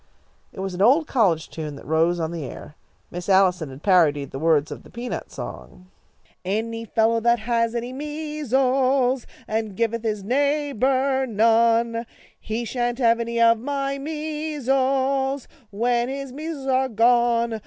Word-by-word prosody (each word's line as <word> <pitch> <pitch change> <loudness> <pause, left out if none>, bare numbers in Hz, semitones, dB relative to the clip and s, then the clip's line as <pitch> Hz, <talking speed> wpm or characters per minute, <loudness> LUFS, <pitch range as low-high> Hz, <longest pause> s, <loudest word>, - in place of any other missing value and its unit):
It 190 - -8
was 190 -1 -3
an 180 - -4
old 275 +10 +5
college 190 - +1
tune 155 -2 -6
that 140 - -12
rose 165 +3 +2
on 160 0 -2
the 170 -3 -5
air. 145 +3 -9 0.4
Miss 175 +2 -6
Allison 185 -5 +3
had 135 +3 -12
parodied 155 -8 +3
the 135 - -6
words 155 -2 +2
of - - -7
the - - -16
peanut 240 +1 -6
song: 185 +1 -9 0.5
Any 225 +4 -2
fellow 225 +1 +2
that 235 +1 +3
has 230 +1 0
any 240 +2 -3
mea 300 +2 -5
sles 260 -1 +2 0.2
And 215 -3 -3
giveth 230 0 0
his 215 -3 -2
neighbour 270 +1 +1
none, 230 +1 +2 0.3
He 225 +2 -4
sha'n't 240 +1 -2
have 235 -2 +3
any 235 0 -2
of 230 -1 +5
my 275 +2 -2
measles 275 -3 -1 0.2
When 240 +3 0
his 275 -1 -5
mea 305 +4 -6
sles 295 -5 -5
are 265 0 +1
gone. 235 0 +2
235 Hz, 155 wpm, -23 LUFS, 210-265 Hz, 0.5 s, old